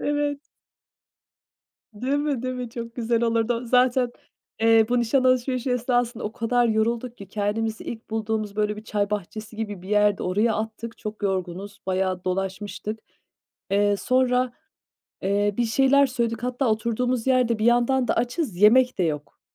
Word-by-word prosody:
Evet. 290 0 -1 1.5
Değil 255 +7 -1
mi, 290 -4 -1
değil 255 0 -2
mi? 250 -2 -5
Çok 230 0 -7
güzel 235 -1 0
olurdu 230 0 +1
o. 235 +2 -4
Zaten, 250 0 +3 0.5
eee, 225 -1 +5
bu 245 0 +2
nişan 255 +3 +2
alışverişi 255 0 +1
esnasında 245 -1 0
o 210 - -3
kadar 240 +1 +1
yorulduk 230 +2 0
ki 200 -1 -11
kendimizi 215 +2 -2
ilk 225 -1 -7
bulduğumuz, 215 -1 -2
böyle, 210 0 0
bir 215 - -9
çay 205 -2 -1
bahçesi 215 +2 -5
gibi 205 -5 -5
bir 190 - -10
yerdi, 210 -1 +3
oraya 210 +5 +1
attık. 225 +1 -5
Çok 215 0 -7
yorgunuz, 190 0 -3
bayağı 185 -1 -1
dolaşmıştık. 195 +3 -3 0.7
Eee, 205 0 +3
sonra, 255 +1 +1 0.7
eee, 205 +1 +1
bir 240 - +2
şeyler 270 +4 +4
söyledik. 235 -2 -2
Hatta 250 0 0
oturduğumuz 235 +3 0
yerde 250 -3 +3
bir 215 - -1
yandan 245 +1 +3
da - - +2
açız, 245 - -1
yemek 245 +5 +5
de - - +2
yok. 150 -3 -3
230 Hz, 155 wpm, -24 LUFS, 210-250 Hz, 1.5 s, eee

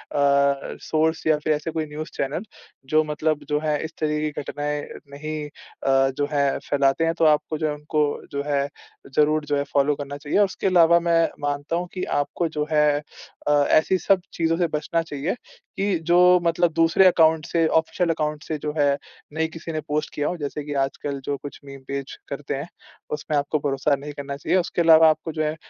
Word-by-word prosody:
Source 140 +3 +1
या 155 -1 +4
फिर 155 +1 +1
ऐसे 150 +2 -3
कोई 160 -1 -2
न्यूज़ 155 +1 -6
चैनल, 140 +7 -2 0.4
जो 155 +3 +3
मतलब 150 0 -1
जो 150 0 +1
हैं 150 -1 0
इस 160 - -6
तरह 150 -1 0
की 150 0 -1
घटनाएँ 145 +1 -3 0.3
नहीं 155 +1 -5
अ, 135 -2 0
जो 145 - +1
हैं 140 -2 +1
फैलाते 140 +2 +2
हैं, 165 - +1
तो 165 - +4
आपको 155 0 +2
जो 155 - -1
है, 150 - -1
उनको 150 0 0 0.3
जो 140 0 -2
है, 140 -1 +1 0.5
ज़रूर 150 0 +3
जो 145 - 0
है 140 - 0
फ़ॉलो 145 +1 +3
करना 140 0 -6
चाहिए। 145 +6 -1
उसके 195 -1 +1
अलावा 170 -2 +6
मैं 170 -1 +3 0.2
मानता 145 +2 -2
हूँ 175 +1 -2
कि 185 - -4 0.2
आपको 165 +4 -2
जो 150 0 0
है 150 -1 +3 0.5
अ, - - +3 0.2
ऐसी 170 +4 +4
सब 195 0 +2
चीज़ों 165 0 +1
से 175 -1 +2
बचना 165 +2 -1
चाहिए 160 +3 -3 0.4
कि 195 -2 +1
जो 175 - +5 0.3
मतलब 170 0 +2
दूसरे 165 +4 +5
अकाउंट 160 -3 +4
से 165 -1 +1
ऑफ़िशियल 160 +2 +1
अकाउंट 150 -1 -1
से 155 - -3
जो 150 0 -3
है 140 -1 +3 0.4
नहीं 160 +1 0
किसी 165 +1 -7
ने 155 -1 -3
पोस्ट 150 +1 -2
किया 145 0 -1
हो। 175 - -2
जैसे 145 0 -4
कि 145 - -4
आजकल 140 +1 -4
जो 145 - -1
कुछ 145 - -9
मीम 140 -1 -10
पेज 140 0 -5
करते 140 0 -4
हैं, 140 +4 -5 0.4
उसमें 150 0 -2
आपको 145 +2 0
भरोसा 140 0 +1
नहीं 145 +2 -8
करना 140 -1 -6
चाहिए, 165 - +1
उसके 175 -1 -1
अलावा 160 -1 +7
आपको 155 +1 -1
जो 155 - 0
हैं, 155 0 -1
150 Hz, 205 wpm, -23 LUFS, 145-160 Hz, 0.5 s, अलावा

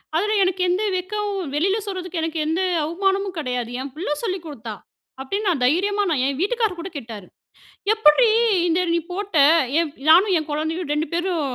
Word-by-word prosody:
அதுல, 420 +6 +1
எனக்கு 370 0 0
எந்த 375 +4 +1
வெட்கவும் 405 +2 -3 0.2
வெளியில 385 +7 +1
சொல்றதுக்கு 365 -3 -4
எனக்கு 325 0 -3
எந்த 330 +4 0 0.2
அவமானமும் 385 +3 -1
கெடையாது. 250 -5 -3
என் 275 +1 -6
புள்ள 335 +1 -4
சொல்லிக் 370 -5 -3
குடுத்தா 230 -8 -7 0.5
அப்டீன்னு, 400 +10 -3
நான் 320 -8 +1
தைரியமா 395 +9 +1
நான் 285 -6 +1
என் 275 0 -1
வீட்டுக்காரர் 420 0 0
கூட 355 +3 -6
கேட்டாரு. 225 -8 -8 0.7
"எப்புட்ரீ, 440 +2 +5 0.4
இத 350 +2 +1
நீ 340 - +2
போட்ட?" 395 -3 -3 0.4
எப் 320 -3 -2
நானும் 370 +4 +6
என் 310 - -3
கொழந்தையும் 315 +2 -2
2 300 +1 -1
பேரும் 350 -1 -1
345 Hz, 165 wpm, -22 LUFS, 305-390 Hz, 0.7 s, நானும்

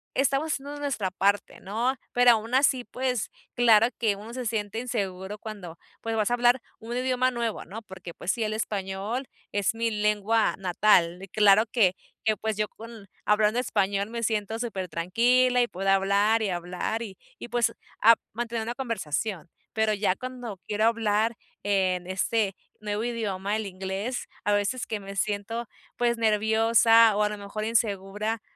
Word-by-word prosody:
estamos 275 +3 +1
haciendo 285 +1 -5
nuestra 235 -10 -2
parte, 200 +2 0
¿no? 230 +7 -1 0.2
Pero 245 0 +7
aún 225 +2 0
así, 260 -2 +3
pues 250 -3 -2 0.3
claro 230 -2 +6
que 215 -4 +2
uno 215 +4 -10
se 250 -1 -4
siente 215 0 -2
inseguro 200 -4 -3
cuando 190 -7 -8 0.2
pues 225 0 -2
vas 215 +2 +1
a - - +3
hablar 245 +1 +4 0.2
un 235 +2 -5
idioma 255 0 +2
nuevo, 235 -3 -3
¿no? 220 +3 -8
Porque 190 -3 -10
pues 185 - -1
sí, 230 - -2
el 215 0 -1
español 210 +4 -3 0.2
es 205 +2 0
mi 230 0 0
lengua 210 +1 +1
natal, 180 -2 +3
y - - -8
claro 210 +2 +5
que, 195 -7 +4 0.3
que 215 -1 +3
pues 220 -1 -2
yo 210 0 0
con 225 -2 -12 0.2
hablando 210 +3 +3
español 200 -3 0
me 235 0 -4
siento 220 0 -1
súper 195 -6 -3
tranquila 245 +9 +3
y 240 - +2
puedo 195 -1 -5
hablar, 200 +3 +3
y 210 - 0
hablar, 180 +6 -3
y 195 -4 -8 0.2
y 240 - -8
pues 240 -1 +1 0.3
a 230 +1 +8 0.2
mantener 235 0 -3
una 235 +2 -3
conversación. 210 - -3 0.2
Pero 220 -1 +2
ya 200 -2 +1
cuando 245 -5 -7
quiero 215 +1 +1
hablar 225 0 +2 0.3
en 185 -3 +1
este 195 +2 0 0.2
nuevo 210 0 -3
idioma, 210 -4 -2
el 220 -2 -2
inglés, 195 +6 -4 0.2
a 205 - +3
veces 205 +5 0
que 215 -2 -3
me 195 0 -9
siento 210 +3 -2 0.3
pues 235 -1 +1
nerviosa, 225 0 +5
o 210 - +1
a 210 - +2
lo 210 - -5
mejor 205 +2 -5
insegura 215 -1 -1
215 Hz, 170 wpm, -27 LUFS, 200-235 Hz, 0.3 s, a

